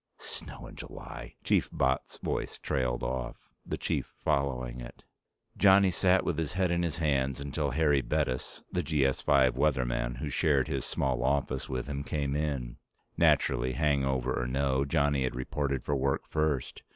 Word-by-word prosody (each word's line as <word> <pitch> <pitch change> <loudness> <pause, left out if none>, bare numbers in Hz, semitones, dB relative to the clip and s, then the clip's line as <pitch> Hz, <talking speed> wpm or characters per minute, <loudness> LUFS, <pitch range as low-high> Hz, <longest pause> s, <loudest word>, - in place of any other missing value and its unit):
Snow - - -6
in - - -11
July 60 -1 -9
..." - - -38
Chief - - +2
Botts' 65 0 0
voice - - -3
trailed 60 -3 -1
off, 60 +1 -4
the - - -4
Chief - - -2
following 65 -3 0
it. - - -10 0.5
Johnny 95 -1 +6
sat 95 +1 +3
with 80 -2 0
his 80 +1 -2
head 90 -1 +1
in 85 0 +1
his 85 -3 -1
hands 70 -4 +1
until 70 +1 -2
Harry 75 0 +3
Bettis, 65 -1 -2
the 90 - 0
GS 70 -4 +1
5 65 -3 +4
weatherman 60 -4 0
who 75 - -4
shared - - +2
his - - -2
small 65 -3 -1
office 65 -1 0
with 65 -2 -2
him, 70 -1 -4
came 70 -2 -2
in. 70 -5 -2 0.4
Naturally, 60 +2 +3
hangover 65 -3 +1
or - - -2
no, 65 +1 +1
Johnny 70 -2 +2
had 65 -2 -1
reported 70 +1 -2
for 70 - 0
work 70 0 0
first. 75 -4 -1
70 Hz, 165 wpm, -30 LUFS, 65-75 Hz, 0.5 s, Johnny